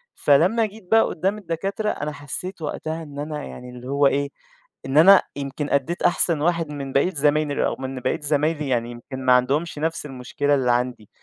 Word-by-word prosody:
فلمّا 180 Hz, +11 st, +3 dB
جيت 215 Hz, -2 st, -11 dB
بقى 225 Hz, 0 st, +6 dB
قُدّام 195 Hz, +6 st, -1 dB
الدكاترة، 195 Hz, +3 st, -3 dB
أنا 150 Hz, -5 st, -3 dB
حسّيت 150 Hz, +6 st, -7 dB
وقتها 160 Hz, +1 st, -4 dB
إن 145 Hz, -2 st, -9 dB
أنا 150 Hz, 0 st, -4 dB
يعني 125 Hz, -, -9 dB
اللي 125 Hz, 0 st, -10 dB
هو 140 Hz, +1 st, +3 dB
إيه، 140 Hz, +1 st, 0 dB, 0.6 s
إن 135 Hz, +2 st, -1 dB
أنا 190 Hz, +5 st, +8 dB
يمكن 140 Hz, +1 st, -4 dB
أدّيت 140 Hz, +6 st, 0 dB
أحسن 170 Hz, -3 st, +2 dB
واحد 165 Hz, -1 st, +1 dB
من 140 Hz, -2 st, -6 dB
بقية 140 Hz, +6 st, +3 dB
زمايلي 150 Hz, -1 st, +1 dB
أو -, -, -1 dB
من 130 Hz, 0 st, -5 dB
بقية 130 Hz, +1 st, -1 dB
زمايلي، 150 Hz, 0 st, 0 dB
يعني 120 Hz, -2 st, 0 dB
يمكن 130 Hz, +2 st, -8 dB
ما 125 Hz, -, +6 dB
عندهمش 145 Hz, +6 st, +1 dB
نفس 160 Hz, 0 st, -2 dB
المشكلة 145 Hz, +1 st, -1 dB
اللي 130 Hz, -3 st, +2 dB
عندي. 120 Hz, -3 st, -1 dB
145 Hz, 185 wpm, -23 LUFS, 135-165 Hz, 0.6 s, أنا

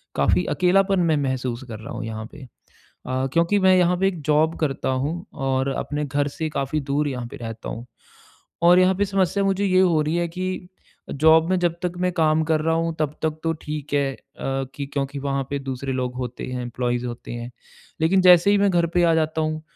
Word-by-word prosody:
काफ़ी 90 Hz, 0 st, +2 dB
अकेलापन 190 Hz, +1 st, +3 dB
मैं 155 Hz, -, +2 dB
महसूस 130 Hz, -3 st, -2 dB
कर 110 Hz, -3 st, -7 dB
रहा 110 Hz, -, -8 dB
हूँ -, -, -5 dB
यहाँ 110 Hz, 0 st, -5 dB
पे। 150 Hz, -, -12 dB
अ, 130 Hz, +1 st, -7 dB
क्योंकि 170 Hz, +5 st, +3 dB
मैं 190 Hz, -1 st, +5 dB
यहाँ 180 Hz, 0 st, +3 dB
पे 195 Hz, +2 st, +2 dB
एक 180 Hz, -5 st, -3 dB
जॉब 155 Hz, +2 st, +2 dB
करता 140 Hz, -4 st, -1 dB
हूँ, 145 Hz, +6 st, -2 dB
और 135 Hz, 0 st, -1 dB
अपने 145 Hz, +2 st, -3 dB
घर 145 Hz, +1 st, 0 dB
से 160 Hz, -1 st, -1 dB
काफ़ी 140 Hz, +1 st, -2 dB
दूर 145 Hz, +1 st, +1 dB
यहाँ 125 Hz, -4 st, -4 dB
पे -, -, -10 dB
रहता 115 Hz, -1 st, -7 dB
हूँ। 120 Hz, +2 st, -6 dB, 0.8 s
और 175 Hz, +1 st, +7 dB
यहाँ 185 Hz, +1 st, +4 dB
पे 200 Hz, +2 st, +1 dB
समस्या 195 Hz, 0 st, +1 dB
मुझे 195 Hz, +1 st, +1 dB
ये 185 Hz, -1 st, +3 dB
हो 170 Hz, -4 st, +3 dB
रही 155 Hz, +2 st, -1 dB
है 175 Hz, -, 0 dB
कि 185 Hz, +1 st, -4 dB, 0.4 s
जॉब 160 Hz, +3 st, +4 dB
में 185 Hz, -, +2 dB
जब 175 Hz, -2 st, +1 dB
तक 175 Hz, -1 st, -1 dB
मैं 180 Hz, 0 st, +1 dB
काम 160 Hz, -2 st, +2 dB
कर 160 Hz, -1 st, +1 dB
रहा 160 Hz, +1 st, +1 dB
हूँ 165 Hz, 0 st, 0 dB
तब 150 Hz, -1 st, -1 dB
तक 155 Hz, 0 st, -1 dB
तो 165 Hz, 0 st, +1 dB
ठीक 150 Hz, -1 st, -6 dB
है 140 Hz, -1 st, +1 dB
अ, -, -, -14 dB, 0.6 s
कि 140 Hz, -, -4 dB
क्योंकि 140 Hz, 0 st, -2 dB
वहाँ 140 Hz, 0 st, -1 dB
पे 140 Hz, -, -1 dB
दूसरे 135 Hz, 0 st, -4 dB
लोग 125 Hz, -1 st, -2 dB
होते 125 Hz, -1 st, -5 dB
हैं 125 Hz, -1 st, -3 dB
एम्प्लॉईज़ 120 Hz, 0 st, -2 dB
होते 120 Hz, 0 st, -7 dB
हैं, 120 Hz, +1 st, -6 dB, 0.5 s
लेकिन 185 Hz, +4 st, +4 dB
जैसे 180 Hz, +1 st, +6 dB
ही 205 Hz, -, +4 dB
मैं 200 Hz, 0 st, +3 dB
घर 170 Hz, -1 st, +2 dB
पे 175 Hz, -, +4 dB
आ 165 Hz, -1 st, +4 dB
जाता 160 Hz, 0 st, 0 dB
हूँ, 155 Hz, 0 st, -2 dB
155 Hz, 220 wpm, -23 LUFS, 135-175 Hz, 0.8 s, और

